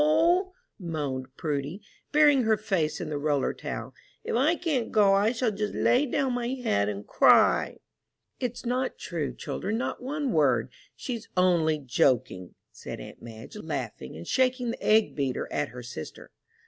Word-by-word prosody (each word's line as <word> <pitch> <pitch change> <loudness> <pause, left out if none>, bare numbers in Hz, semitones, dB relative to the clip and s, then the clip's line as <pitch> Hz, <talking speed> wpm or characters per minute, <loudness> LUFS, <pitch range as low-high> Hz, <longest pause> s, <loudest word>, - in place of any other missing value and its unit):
moaned 145 -7 -3
Prudy, 150 +3 -3 0.3
burying 295 -3 +5
her 220 -2 +2
face 170 -9 -1
in 165 - -4
the 150 -1 -2
roller 145 -2 +1
towel, - - -6 0.3
"if - - -2
I 290 +8 +3
can't 290 -10 -1
go 205 -2 +5
I 205 +3 +3
shall 240 -1 0
just 210 0 -3
lay 260 +4 +3
down 265 0 0
my 245 -1 -2
head 240 - 0
and 100 0 -5
cry!" - - +4 0.6
"It's 245 0 -4
not 255 +2 -1
true, 160 -5 -3
children, 215 +3 -3
not 245 - -3
one 280 +1 -2
word; 130 - +2 0.2
she's 235 -3 -6
only 170 -4 +3
joking," 125 -8 0 0.2
said - - -8
aunt - - -11
Madge, 115 -1 -10
laughing - - -5
and 85 - -9
shaking 255 -2 +1
the - - -8
egg 215 0 +4
beater 135 -3 -2
at 145 0 -1
her 125 0 -9
sister. 100 -10 -9
195 Hz, 160 wpm, -27 LUFS, -, 0.6 s, burying